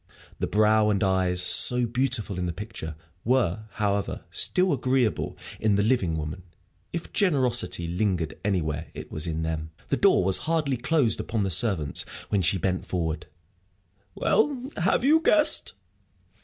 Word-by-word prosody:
The - - -1
brow 110 0 +3
and 100 -2 +1
eyes, 95 -2 +1
so 125 +6 +5
beautiful 120 -5 -1
in 90 - -2
the - - -2
picture, 85 -6 -7 0.3
were, 110 -5 0
however, 100 -1 -2
still 185 -1 +2
agreeable 130 - 0 0.2
in 105 -2 +2
the 100 - +2
living 100 -9 +1
woman; 75 +4 -5 0.5
if 170 0 -6
generosity 125 - +1
lingered 90 -2 -1
anywhere, 80 -6 -2
it - - -9
was 80 +2 -3
in 80 0 -3
them. 80 -1 -3 0.2
The - - +1
door - - +4
was 95 0 +2
hardly 150 -5 0
closed 130 -2 +1
upon 110 -2 -2
the 95 - -2
servants 80 - +2 0.3
when 100 - +1
she 90 +3 +2
bent 95 0 -2
forward. 85 -3 -3 0.9
"Well, 265 +3 0
have 185 +7 +1
you 310 +4 +4
guessed?" 310 -1 +3
105 Hz, 150 wpm, -25 LUFS, 90-130 Hz, 0.9 s, so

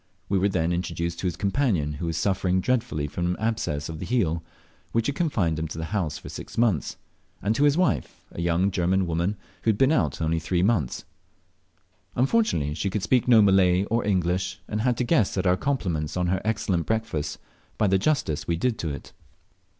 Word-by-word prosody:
We 100 - +2
were 100 +2 +2
then 85 -2 0
introduced 85 -1 -3
to 95 - -1
his 85 - -2
companion 100 - 0
who 80 +4 -4
was 80 -1 -2
suffering 95 0 +1
dreadfully 115 - 0
from 85 +4 -2
an 90 - -1
abscess 110 -10 -1
on 80 -2 -6
the - - -5
heel, 85 -10 0 0.5
which 115 -1 +1
had 140 - -1
confined 100 - 0
him 80 - -2
to 80 - -7
the 80 - -3
house 85 -8 -1
for - - -11
six - - -8
months 110 -10 +1 0.4
and 105 +2 0
to 140 +6 +2
his 145 +1 +4
wife, 140 - 0
a - - -6
young 85 +3 +2
German 95 +1 +1
woman, 85 +5 -1 0.2
who - - 0
had 105 - +2
been 135 +4 +4
out 80 - +1
only 80 0 0
three 85 +2 0
months. 95 - 0 1.1
Unfortunately 125 - +2
she 100 +5 -2
could 95 0 -2
speak 125 +4 +2
no 115 -4 +7
Malay 95 -2 +4
or 115 +1 +2
English, 90 -1 0
and 105 0 -2
had 120 0 +1
to - - +1
guess 120 - +2
at 95 - 0
our 90 0 +4
compliments 90 - -2
on 90 - +1
her 95 +2 0
excellent 105 -6 0
breakfast 110 -9 -2 0.4
by 110 - +2
the 95 -1 +3
justice 100 - 0
we 85 - +1
did 115 +6 -1
to 80 - -2
it. 70 -3 -7
95 Hz, 205 wpm, -25 LUFS, 85-110 Hz, 1.1 s, no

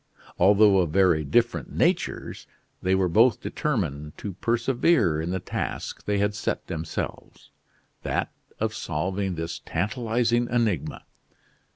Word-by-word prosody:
Although 100 +1 +6
of 85 -3 +1
very 85 -2 +3
different 70 - +1
natures, - - -1 0.3
they 95 +1 +2
were 95 -1 +2
both 115 +8 +4
determined 80 - -3
to 100 - -5
persevere 115 - +2
in 80 - -3
the 95 +1 -1
task - - -5
they 105 0 0
had 100 +1 +1
set 105 - -3
themselves 80 -1 -6 0.5
that - - -2 0.3
of - - -1
solving 95 +4 -2
this 80 0 -4
tantalizing 120 +4 0
enigma. 110 - -1
95 Hz, 120 wpm, -25 LUFS, 85-115 Hz, 0.5 s, Although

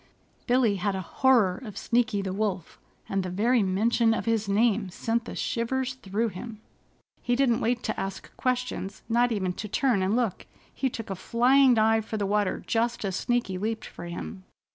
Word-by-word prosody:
Billy 245 -5 +3
had 195 +1 -1
a 190 - -2
horror 220 0 +2
of 210 -4 -8
Sneaky 230 -4 +1
the 190 -1 -3
Wolf, 195 -4 -3 0.3
and 195 0 0
the 185 - -4
very 225 +6 +2
mention 225 +4 +2
of - - -3
his 225 -3 0
name 210 -1 +2
sent 225 +5 -2
the - - -7
shivers 260 +2 -1
through 225 -2 -2
him. 215 +3 -8 0.6
He 245 - +1
didn't 245 -3 +2
wait 240 +1 0
to 220 - -2
ask 195 0 -6
questions, 250 -6 -2
not 240 +1 +2
even 190 -4 -1
to 210 - -6
turn 240 -1 +1
and 190 +3 +1
look. 235 -6 -1 0.3
He 265 - -1
took 225 -4 -6
a - - -2
flying 250 +6 +4
dive 220 0 +3
for 220 0 -4
the 205 - -1
water 205 -1 0
just 235 -1 0
as 190 -2 -2
Sneaky 235 -5 -1
leaped 220 +2 -2
for - - -9
him. 175 +2 -7
220 Hz, 185 wpm, -27 LUFS, 195-240 Hz, 0.6 s, flying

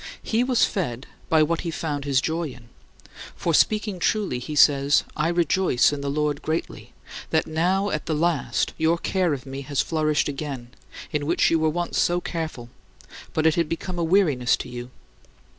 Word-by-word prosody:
He 230 +2 +1
was 250 -2 +3
fed 130 - -3 0.2
by 160 -1 +5
what 165 +2 0
he 170 - -4
found 145 -3 -3
his 135 -2 +2
joy 165 +2 -1
in; 120 -3 -14 0.7
for, 170 - -1
speaking 210 +2 +2
truly, 195 - 0
he 150 +5 -6
says, 140 0 +5
"I - - 0
rejoice 170 -5 +2
in 145 - -4
the 140 - -2
Lord 150 0 -1
greatly, 160 +1 -4 0.4
that - - +1
now 185 +5 0
at 155 - -3
the 160 - 0
last 165 -1 0
your 160 +2 +3
care 180 0 0
of 140 -2 -3
me 135 0 -6
has 140 0 -3
flourished 155 -2 +1
again, 140 -4 -5 0.4
in 150 -2 -2
which 170 - +3
you 165 - +3
were 160 0 +2
once 175 +2 -2
so 175 0 +2
careful, 160 -9 -5 0.6
but 155 - 0
it 160 - +5
had 165 -2 0
become 175 +2 -4
a - - +1
weariness 160 -8 +3
to - - -7
you. 120 0 -7
155 Hz, 185 wpm, -24 LUFS, 140-175 Hz, 0.7 s, by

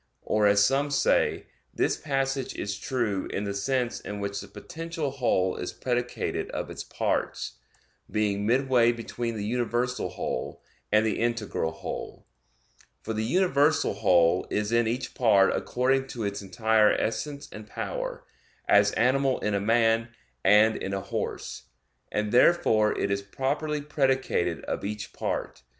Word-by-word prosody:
Or, 105 -1 +2
as 100 0 +5
some 140 +4 +1
say, 140 - +2 0.3
this - - +1
passage 135 -2 -2
is 100 0 -4
true 115 -7 -1
in 100 - -3
the 100 -1 -2
sense 120 +4 -1
in 105 0 -6
which 100 0 -3
the - - -10
potential 165 -3 -5
whole 115 -9 +1
is 90 - -4
predicated 125 -1 -2
of - - -4
its - - -6
parts, - - -2 0.5
being 105 -1 0
midway 125 -1 +4
between 115 0 -4
the 105 -1 -3
universal 120 +2 -1
whole, - - -4 0.3
and 110 +1 +4
the 110 - 0
integral 115 -8 -1
whole. - - -7 0.8
For 110 - -3
the 110 0 -1
universal 150 - +2
whole 90 -2 +3
is 105 +1 -1
in 115 -1 +3
each 120 +3 -3
part 100 -6 +4
according 135 +2 0
to 120 -3 -5
its 100 0 -3
entire 110 +2 +3
essence 140 +6 -2
and 105 0 -9
power; - - -5 0.4
as 100 0 +5
animal 130 +3 +2
in 105 - 0
a 100 - +1
man 115 +1 +2 0.3
and 105 +3 +5
in 100 +1 -3
a 95 - -2
horse; 95 - -5 0.5
and 105 0 -1
therefore 115 -5 +4
it 100 - 0
is 100 0 0
properly 145 +8 -2
predicated 135 - 0
of - - -3
each 105 +1 -5
part. - - -3
115 Hz, 150 wpm, -27 LUFS, 100-130 Hz, 0.8 s, as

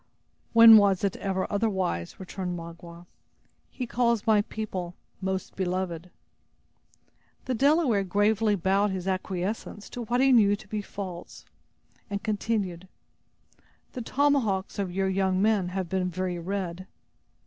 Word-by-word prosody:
"When 230 -1 +10
was 200 -2 +3
it 200 - 0
ever 190 -1 -2
otherwise?" 190 - -1
returned 185 -1 -5
Magua. 170 +1 -10 0.6
"He 255 - -5
calls 235 -2 0
my 215 -2 +4
people 190 -5 -5 0.3
'most 190 0 -3
beloved'." 180 -2 -3 1.4
The 260 - -1
Delaware 270 -4 +3
gravely 205 +3 +2
bowed 195 +2 +1
his 190 -1 -4
acquiescence 190 +2 -3
to 245 - -6
what 240 +3 0
he 270 +1 +4
knew 205 -5 +5
to 205 - -14
be 210 0 -3
false, 185 -3 -8 0.6
and 200 0 -4
continued: 205 -5 -2 1.1
"The 250 - -5
tomahawks 240 -8 0
of 190 -3 -2
your 190 +1 0
young 190 -1 +1
men 205 -2 +2
have 185 0 -3
been 185 +1 -1
very 180 0 -3
red." 185 0 -4
195 Hz, 130 wpm, -27 LUFS, 185-220 Hz, 1.4 s, When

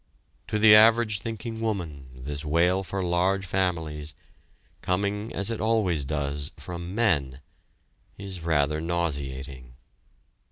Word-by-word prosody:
To 105 - -1
the 105 0 +7
average 110 -1 +6
thinking 115 +1 -5
woman, 85 -11 -3
this 70 +3 -6
wail 85 +5 +2
for 95 0 -3
large 90 +2 +1
families, 80 -5 -2 0.7
coming 100 +4 -1
as 100 +4 +2
it 115 - -3
always 105 -10 +1
does 70 0 -2
from 85 +1 -7
men, 75 - +1 0.8
is 95 -3 -7
rather 75 -2 +1
nauseating. 70 -7 -4
85 Hz, 115 wpm, -26 LUFS, 75-100 Hz, 0.8 s, the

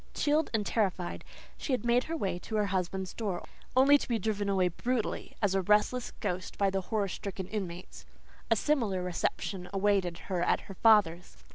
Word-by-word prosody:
Chilled 300 +1 +2
and 215 -3 0
terrified, 190 -6 -1 0.4
she 275 - -2
had 245 -2 -1
made 240 +1 +3
her 330 +1 -3
way 190 - -2
to 220 - -6
her 210 -1 +2
husband's 190 -1 -2
door, 200 -6 -3 0.3
only 285 +2 +7
to - - -5
be 235 - +1
driven 205 -1 -1
away 190 -2 +3
brutally 235 +6 -2
as 200 -2 +3
a 195 - +2
restless 210 +6 +2
ghost 185 +1 -3
by 200 -1 +2
the 195 0 0
horror 205 +1 -1
stricken 190 0 -5
inmates. 185 -4 -6 0.5
A 225 - +5
similar 220 -7 +1
reception 180 +1 -2
awaited 195 -3 +1
her 185 -3 -1
at 175 - +2
her 195 - -10
father's. 195 -5 +3
200 Hz, 180 wpm, -30 LUFS, 185-225 Hz, 0.5 s, only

